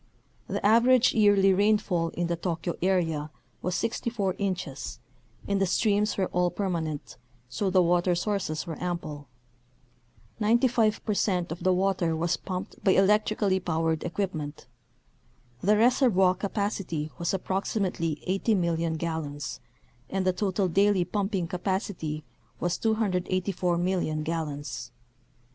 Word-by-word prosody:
The - - -3
average 240 +3 +5
yearly 205 -3 +5
rainfall 195 -4 +2
in 175 - +1
the 170 0 0
Tokyo 170 0 -3
area 165 -5 +1 0.3
was 180 +1 -1
64 225 -4 -1
inches 180 -9 -3 0.5
and 200 -1 0
the 195 - +3
streams 210 +3 +1
were 190 - +2
all 180 0 +2
permanent, 165 -9 -3 0.3
so 195 +10 -1
the 185 -1 +4
water 175 +1 +2
sources 180 -4 -2
were 165 -2 -6
ample. 155 -5 -4 1.1
Ninety 230 +4 +4
five 225 -3 +1
percent 190 -5 0
of 165 - -5
the 185 - +3
water 185 -3 +1
was 170 +2 0
pumped 185 +2 -6
by 190 - +5
electrically 205 0 +3
powered 165 -2 -1
equipment. 170 -5 -4 1.0
The 210 +2 +3
reservoir 225 -6 +4
capacity 195 -6 -3
was 170 - 0
approximately 190 -4 -2
80,000,000 170 -5 +1
gallons 155 -4 -4 0.5
and 190 -1 -1
the 185 - +3
total 195 0 0
daily 195 +1 +3
pumping 195 -3 -1
capacity 175 -4 -3 0.4
was 175 0 0
284,000,000 185 -5 0
gallons. 145 -6 -4
185 Hz, 120 wpm, -27 LUFS, 165-200 Hz, 1.1 s, average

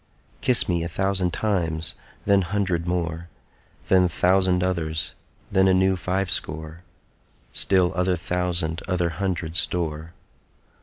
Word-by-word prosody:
Kiss 125 -2 +6
me 85 -2 0
a 85 - -2
thousand 95 +1 -1
times, 85 -6 -1 0.3
then 100 -1 +4
hundred 90 -2 -1
more, 85 -1 -2 0.6
Then 90 -1 +4
thousand 90 +1 +2
others, 80 -4 -2 0.4
then 95 -1 +3
a 95 - +4
new 95 0 +3
five 95 +1 -1
score, 80 +2 -2 0.7
Still 95 -2 +3
other 90 +1 +1
thousand 90 -1 -2
other 90 -3 0
hundred 85 -1 -3
store. 80 -2 -1
90 Hz, 120 wpm, -24 LUFS, 85-95 Hz, 0.7 s, Kiss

